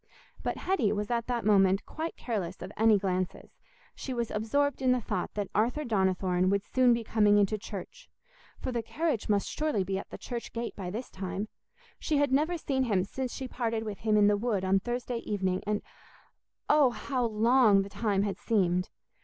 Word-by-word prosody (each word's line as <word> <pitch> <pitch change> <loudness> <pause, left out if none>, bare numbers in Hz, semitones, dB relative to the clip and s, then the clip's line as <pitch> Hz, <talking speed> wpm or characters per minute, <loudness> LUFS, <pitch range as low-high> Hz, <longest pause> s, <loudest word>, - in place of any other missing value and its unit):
But - - -2
Hetty 310 - +1
was 210 +2 -3
at 235 -1 0
that 240 -3 -1
moment 195 -2 +4
quite 320 +1 -5
careless 190 -7 -4
of 185 - -7
any 220 -1 +5
glances—she 195 - -5
was 235 -2 -2
absorbed 270 +6 0
in 255 -1 +4
the 250 - +1
thought 230 - -3
that 205 -2 -2
Arthur 240 +9 +1
Donnithorne 185 -4 +1
would 200 0 +1
soon 255 -1 +3
be 235 -1 +1
coming 210 -2 +4
into 205 +1 +2
church, 205 - -8 0.5
for - - -4
the 240 -1 -1
carriage 290 -1 -2
must 205 -1 +2
surely 300 -11 0
be 190 +1 -2
at - - -9
the - - -8
church 240 -2 -6
gate 235 0 -4
by 185 -3 -5
this 230 +7 -5
time. 195 +2 -4 0.5
She 305 - 0
had 285 -2 +2
never 310 +6 +2
seen 265 -4 0
him 200 -6 +2
since 255 +6 -4
she 265 - -5
parted 230 -3 -2
with 210 -3 -5
him 215 -1 +2
in 205 - +6
the 205 0 +4
wood 205 -4 -1
on 190 +1 +3
Thursday 245 +3 -3
evening, 190 -4 -1
and 210 0 0 0.8
oh, 295 -3 +5
how 245 +3 -2
long 225 -2 +4
the 195 - -8
time 200 -2 0
had 200 -2 -3
seemed! 180 -4 +1
215 Hz, 195 wpm, -29 LUFS, 195-250 Hz, 0.8 s, in